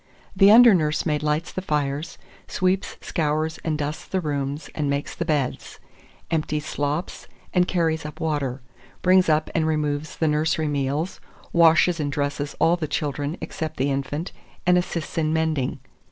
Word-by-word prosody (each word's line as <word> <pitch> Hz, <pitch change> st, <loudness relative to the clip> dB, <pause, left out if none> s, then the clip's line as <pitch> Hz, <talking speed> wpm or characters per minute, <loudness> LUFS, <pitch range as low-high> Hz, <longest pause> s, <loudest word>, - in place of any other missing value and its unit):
The 195 Hz, +1 st, +7 dB
under 235 Hz, +1 st, +9 dB
nursemaid 150 Hz, -2 st, +1 dB
lights 150 Hz, +2 st, -1 dB
the 185 Hz, -, -3 dB
fires, 150 Hz, -2 st, -2 dB, 0.3 s
sweeps, 185 Hz, +1 st, 0 dB
scours, 155 Hz, 0 st, -1 dB
and 155 Hz, -2 st, -1 dB
dusts 150 Hz, +1 st, -4 dB
the 190 Hz, -, -1 dB
rooms, 145 Hz, -2 st, -3 dB
and 150 Hz, -2 st, -1 dB
makes 140 Hz, +1 st, -2 dB
the 170 Hz, -, -3 dB
beds; 145 Hz, -6 st, -2 dB, 0.5 s
empties 155 Hz, -2 st, -1 dB
slops, 145 Hz, +4 st, -3 dB, 0.3 s
and 180 Hz, -1 st, +3 dB
carries 165 Hz, -3 st, 0 dB
up 150 Hz, 0 st, -8 dB
water; 140 Hz, -5 st, -2 dB, 0.4 s
brings 185 Hz, -1 st, +5 dB
up 155 Hz, 0 st, +2 dB
and 160 Hz, -1 st, +1 dB
removes 150 Hz, -1 st, -1 dB
the 160 Hz, -, +1 dB
nursery 155 Hz, +1 st, +1 dB
meals; 145 Hz, +4 st, -2 dB, 0.3 s
washes 170 Hz, +1 st, +5 dB
and 145 Hz, -2 st, -1 dB
dresses 145 Hz, 0 st, -2 dB
all 165 Hz, +2 st, +4 dB
the 160 Hz, -3 st, -3 dB
children, 145 Hz, +2 st, -2 dB
except 155 Hz, -1 st, -5 dB
the 140 Hz, +2 st, +1 dB
infant, 140 Hz, +5 st, -3 dB, 0.3 s
and 180 Hz, 0 st, +5 dB
assists 175 Hz, -2 st, -2 dB
in 155 Hz, -1 st, +1 dB
mending. 155 Hz, -6 st, 0 dB
155 Hz, 155 wpm, -24 LUFS, 145-165 Hz, 0.5 s, under